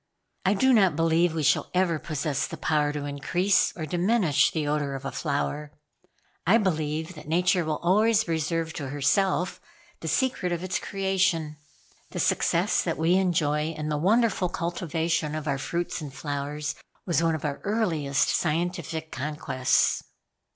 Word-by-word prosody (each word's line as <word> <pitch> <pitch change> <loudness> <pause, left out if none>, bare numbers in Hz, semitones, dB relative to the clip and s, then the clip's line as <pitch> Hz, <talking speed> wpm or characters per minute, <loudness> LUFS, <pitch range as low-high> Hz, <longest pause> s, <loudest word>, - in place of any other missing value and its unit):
I 195 +2 +3
do 260 +6 +4
not 190 -8 +4
believe 165 +1 +2
we 160 - -1
shall - - +2
ever 175 -4 +2
possess 150 -2 -2
the - - -7
power 150 -2 +1
to 145 -1 -4
increase 175 +7 +1
or 160 - -3
diminish 175 0 +2
the 155 -3 -2
odor 145 -2 -1
of 135 0 -7
a - - -3
flower. 145 0 -2 0.7
I 210 +6 +6
believe 160 -4 -1
that 150 -3 -12
Nature 180 +2 +2
will 155 -1 -1
always 215 +4 +3
reserve 165 0 -1
to 140 -4 -5
herself 180 +6 +1 0.4
the 160 - -6
secret 195 - 0
of 175 0 -2
its 185 0 -1
creation. 190 -6 0 0.5
The - - -5
success - - +2
that - - -2
we 165 +3 +2
enjoy 160 -4 +1
in 155 0 -3
the 150 - 0
wonderful 205 0 +2
cultivation 165 -2 -2
of 155 0 -5
our 140 -2 0
fruits 170 +4 -3
and 145 -3 -6
flowers 145 +1 -4 0.3
was 170 -3 +1
one 165 -1 +2
of 155 - -5
our 145 -1 -2
earliest 165 -10 0
scientific 165 -1 -1
conquests." 140 -2 0
160 Hz, 160 wpm, -26 LUFS, 150-180 Hz, 0.7 s, I